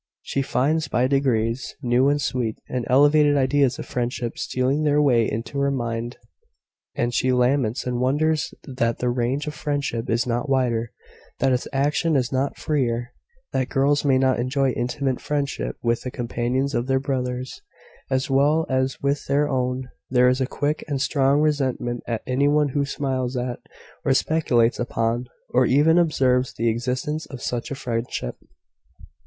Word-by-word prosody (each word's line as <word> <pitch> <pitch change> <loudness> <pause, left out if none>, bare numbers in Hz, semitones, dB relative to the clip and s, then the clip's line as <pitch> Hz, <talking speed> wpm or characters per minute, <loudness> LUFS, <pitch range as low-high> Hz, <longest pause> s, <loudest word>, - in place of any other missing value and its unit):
She 140 - -1
finds, 145 +3 0
by 125 -1 +1
degrees, 125 -3 0
new, 125 +3 +3
and 145 0 +1
sweet, 125 -6 -2
and 125 -2 -3
elevated 145 +2 +5
ideas 135 -1 +2
of - - -6
friendship 120 -1 -3
stealing 130 +4 0
their 150 -1 +3
way 125 -6 +3
into 115 +5 -4
her 140 0 +2
mind, 120 -2 -3 0.8
and 120 0 -1
she 130 +1 +2
laments 125 -2 +1
and 125 -1 -1
wonders 150 +5 +1
that 120 -4 -1
the 125 0 0
range 125 +4 -1
of 150 - -4
friendship 145 -6 -2
is 115 +2 +1
not 120 +3 -2
wider 120 -4 +1 0.5
that 135 0 +2
its 125 - -1
action 145 +4 +1
is 125 -3 +1
not 135 +1 -1
freer 120 -4 -1 0.4
that 130 - 0
girls 140 +2 +2
may 135 -3 +3
not 130 -2 +2
enjoy 130 +2 +1
intimate 125 +2 -2
friendship 145 -1 -2
with 115 0 +1
the 125 - -4
companions 125 +3 -2
of 120 0 -1
their 135 0 +2
brothers, 130 - -3 0.5
as 130 0 0
well 145 +4 +3
as 130 0 0
with 140 +1 0
their 145 +2 +2
own. 130 -1 -1 0.2
There 125 0 +4
is 130 +1 +1
a 130 - +1
quick 145 +3 -2
and 140 -3 -2
strong 140 +1 +2
resentment 130 -5 0
at 115 -2 -2
any 135 +2 +1
one 150 0 +3
who 140 +1 0
smiles 130 -2 -2
at, 125 0 -3 0.4
or 135 - +2
speculates 125 -6 +2
upon, 120 0 -1 0.2
or 125 0 +3
even 155 +6 +4
observes 130 -6 +2
the 115 +1 +1
existence 130 +7 -2
of 135 -3 -9
such 120 -1 -3
a 140 - -4
friendship." 115 - -3
130 Hz, 165 wpm, -23 LUFS, 120-140 Hz, 0.8 s, elevated